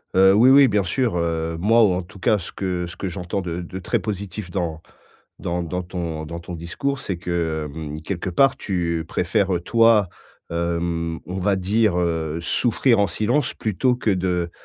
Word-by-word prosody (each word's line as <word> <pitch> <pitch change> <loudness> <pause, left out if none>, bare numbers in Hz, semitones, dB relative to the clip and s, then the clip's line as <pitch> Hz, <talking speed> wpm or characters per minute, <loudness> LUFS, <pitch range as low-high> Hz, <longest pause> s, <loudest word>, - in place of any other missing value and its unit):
Heu, 95 +1 +7
oui 115 +6 +6
oui, 135 0 +8
bien 105 -3 +2
sûr, 110 +5 0
heu, 80 -1 -1
moi 115 +7 +4
ou 95 - +2
en 90 - -1
tout 95 +2 -14
cas 105 +4 +3
ce 90 - -7
que 90 -2 -2
ce 85 - -9
que 95 - -3
j'entends 90 +2 -3
de 90 -1 -4
de 90 +2 -7
très 90 - 0
positif 100 -2 -5
dans 85 -3 -3 0.6
dans 85 0 -2
dans 90 +2 -3
ton 85 -3 -4
dans 85 +2 -6
ton 85 +1 -8
discours, 135 +12 -3
c'est 95 -8 -3
que, 80 -3 -2
hem, 75 -1 -6
quelque 90 +2 -3
part, 135 +10 +3
tu 85 -4 -2
préfères, 95 +2 +1
heu, 85 - -2
toi, 115 -2 +4 0.4
hem, 85 -1 -1
on 95 +2 -4
va 100 +1 +2
dire, 100 +1 +1
heu, 80 -2 -1
souffrir 115 +5 +2
en 100 - +3
silence 110 - 0
plutôt 115 +4 0
que 120 - -1
de, 90 -3 0
90 Hz, 195 wpm, -22 LUFS, 85-100 Hz, 0.6 s, oui